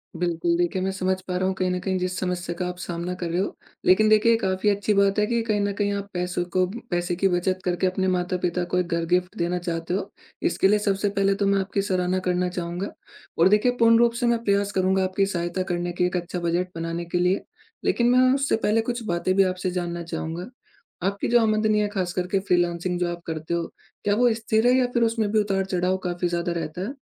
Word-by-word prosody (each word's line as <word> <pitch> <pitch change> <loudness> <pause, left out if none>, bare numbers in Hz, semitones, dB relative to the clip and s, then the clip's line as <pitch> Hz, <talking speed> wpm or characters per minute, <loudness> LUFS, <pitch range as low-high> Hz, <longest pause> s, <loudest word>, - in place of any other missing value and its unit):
बिल्कुल, 170 0 0
देखिए 175 +2 0
मैं 190 - 0
समझ 190 -1 0
पा 180 - -2
रहा 185 - 0
हूँ 190 - 0
कहीं 185 -1 0
न 180 - -1
कहीं 190 0 -1
जिस 185 0 -2
समस्या 180 -2 -2
का 180 - -1
आप 180 - -5
सामना 175 0 -4
कर 175 -2 -4
रहे 175 +2 -1
हो, 200 - -4 0.3
लेकिन 215 +4 +5
देखिए 215 +2 +5
ये 225 - +4
काफ़ी 190 -1 0
अच्छी 205 +1 +1
बात 200 0 +3
है 210 - +3
कि 235 0 +1
कहीं 215 -2 0
न 200 0 0
कहीं 205 0 0
आप 200 0 -4
पैसों 180 0 -1
को 185 0 +3 0.3
पैसे 175 0 0
की 195 +2 +2
बचत 185 +1 0
करके 180 +1 +1
अपने 190 +1 0
माता-पिता 180 -1 0
को - - +3
एक 175 - -1
घर 170 0 0
गिफ्ट 180 +1 0
देना 175 +1 0
चाहते 170 -1 -3
हो। 195 - -2 0.3
इसके 190 - +2
लिए 210 +1 +3
सबसे 200 0 0
पहले 195 0 +2
तो 200 0 0
मैं 200 0 +3
आपकी 195 +1 -1
सराहना 185 -1 0
करना 180 0 +1
चाहूँगा, 180 +2 -4 0.5
और 170 +3 +5
देखिए 210 +5 +4
पूर्ण 230 0 +6
रूप 235 0 +4
से - - +2
मैं 235 -1 +1
प्रयास 200 -1 +1
करूँगा 190 0 +2
आपकी 185 +1 +1
सहायता 175 -1 -2
करने 175 -1 -2
के 180 - +4
एक 180 +1 -1
अच्छा 175 +1 -4
बजट 175 +1 0
बनाने 165 +1 -3
के 170 +1 -2
लिए, 180 +2 +2 0.4
लेकिन 240 0 +2
मैं 255 +1 +5
उससे 275 0 +1
पहले 225 +2 +3
कुछ 240 0 -3
बातें 175 +1 0
भी 195 - +6
आपसे 185 -1 -1
जानना 175 -1 -3
चाहूँगा। 165 +1 -5 0.6
आपकी 200 0 -2
जो 240 - +5
आमदनी 215 -1 +2
है 210 - +1
ख़ास 185 -4 -2
करके 180 +2 0
फ्रीलांसिंग 175 -2 0
जो 175 -1 0
आप 175 0 -6
करते 160 0 -4
हो, 170 -1 -1 0.4
क्या 205 0 +2
वो 245 0 +4
स्थिर 220 +1 +1
है 250 - +5
या 255 - +3
फिर 235 - +2
उसमें 225 -2 +1
भी 220 - +3
उतार-चढ़ाव 190 -2 0
काफ़ी 175 0 -1
ज़्यादा 170 0 -1
रहता 165 0 -4
है? 215 +8 -3
185 Hz, 235 wpm, -24 LUFS, 175-205 Hz, 0.6 s, पूर्ण